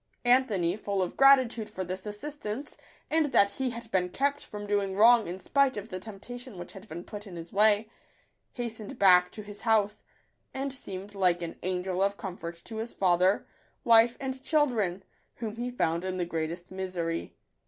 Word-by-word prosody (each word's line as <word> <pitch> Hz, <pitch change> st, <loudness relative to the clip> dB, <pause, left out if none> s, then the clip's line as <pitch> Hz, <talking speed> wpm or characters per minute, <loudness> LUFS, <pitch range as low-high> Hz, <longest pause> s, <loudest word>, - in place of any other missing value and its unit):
Anthony, 220 Hz, -9 st, +3 dB
full 200 Hz, -2 st, -1 dB
of 180 Hz, -, -5 dB
gratitude 260 Hz, -5 st, +5 dB
for 185 Hz, -, -4 dB
this 185 Hz, +3 st, -5 dB
assist 290 Hz, +9 st, -7 dB
ance, 230 Hz, +8 st, -5 dB, 0.4 s
and 320 Hz, -1 st, +3 dB
that 200 Hz, -7 st, +4 dB
he 260 Hz, +5 st, -2 dB
had 235 Hz, -1 st, -8 dB
been 180 Hz, -3 st, +1 dB
kept 280 Hz, +7 st, 0 dB
from 205 Hz, 0 st, -7 dB
doing 200 Hz, -2 st, 0 dB
wrong 230 Hz, +2 st, +6 dB
in 175 Hz, +2 st, -4 dB
spite 270 Hz, +5 st, +2 dB
of 205 Hz, +2 st, -6 dB
the 185 Hz, -, -4 dB
temptation 225 Hz, +3 st, -9 dB
which 175 Hz, -, -8 dB
had 195 Hz, +1 st, -11 dB
been 170 Hz, 0 st, -7 dB
put 205 Hz, +2 st, -8 dB
in 185 Hz, -, -9 dB
his 170 Hz, 0 st, -9 dB
way, 210 Hz, +1 st, +4 dB, 0.7 s
hastened 230 Hz, -4 st, -5 dB
back 180 Hz, -2 st, +6 dB
to 215 Hz, -, -8 dB
his 205 Hz, 0 st, -10 dB
house, 210 Hz, -2 st, +1 dB, 0.5 s
and 270 Hz, 0 st, -2 dB
seemed 200 Hz, -5 st, -6 dB
like 180 Hz, -3 st, +2 dB
an 165 Hz, -, -5 dB
angel 185 Hz, 0 st, -1 dB
of 200 Hz, +1 st, +1 dB
comfort 175 Hz, -3 st, -6 dB
to 225 Hz, -, -7 dB
his 225 Hz, +2 st, -5 dB
father, 185 Hz, +1 st, +3 dB, 0.4 s
wife, 230 Hz, -1 st, +5 dB
and 265 Hz, -1 st, -4 dB
children, 230 Hz, -, +1 dB, 0.3 s
whom 225 Hz, -2 st, -5 dB
he 245 Hz, +1 st, -2 dB
found 170 Hz, -8 st, 0 dB
in 185 Hz, 0 st, -3 dB
the 175 Hz, -, 0 dB
greatest 170 Hz, +2 st, -4 dB
misery. 180 Hz, -3 st, -3 dB
205 Hz, 185 wpm, -29 LUFS, 185-235 Hz, 0.7 s, wrong